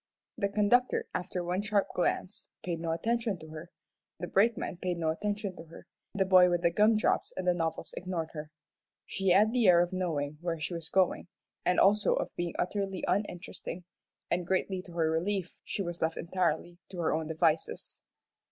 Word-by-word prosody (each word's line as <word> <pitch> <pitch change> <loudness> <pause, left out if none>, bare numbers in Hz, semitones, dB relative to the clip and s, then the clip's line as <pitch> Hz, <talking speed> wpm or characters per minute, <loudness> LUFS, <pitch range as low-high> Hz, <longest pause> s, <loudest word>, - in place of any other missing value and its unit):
The 200 - 0
conductor, 215 +5 +2
after 180 0 -3
one 180 +3 -1
sharp 205 -1 +1
glance, 185 +2 -1 0.2
paid 170 -2 -2
no 165 0 -3
attention 225 +3 0
to 160 -1 -12
her, 155 +2 -9 0.5
the 175 - -3
brakemen 200 0 +1
paid 180 -1 -2
no 160 -1 0
attention 205 +3 -2
to - - -9
her, 165 +1 -13 0.3
the 195 -1 +2
boy 185 -1 +7
with 175 0 0
the 170 - +4
gum 215 +5 +4
drops 215 - +1
and 185 - -2
novels 165 -2 -3
ignored 175 -3 -3
her. 150 -1 -6 0.6
She 195 0 -3
had 205 +5 +5
the 240 -5 +3
air 175 -2 +7
of 175 +1 +1
knowing 150 -5 -2
where 170 -2 -2
she 155 +4 -3
was 165 -1 -6
going, 185 -2 +2 0.4
and 180 - +2
also 205 +1 +4
of - - -3
being 175 -1 -3
utterly 195 +1 -2
uninteresting, 180 -2 -3 0.5
and 175 0 0
greatly 190 0 0
to 175 - -11
her 165 -2 +1
relief 180 +3 -2
she 200 - -3
was 175 -1 -5
left 160 0 0
entirely 175 -1 -1
to 190 - -9
her 170 -2 +1
own 160 0 -1
devices. 160 0 0
180 Hz, 185 wpm, -30 LUFS, 165-195 Hz, 0.6 s, boy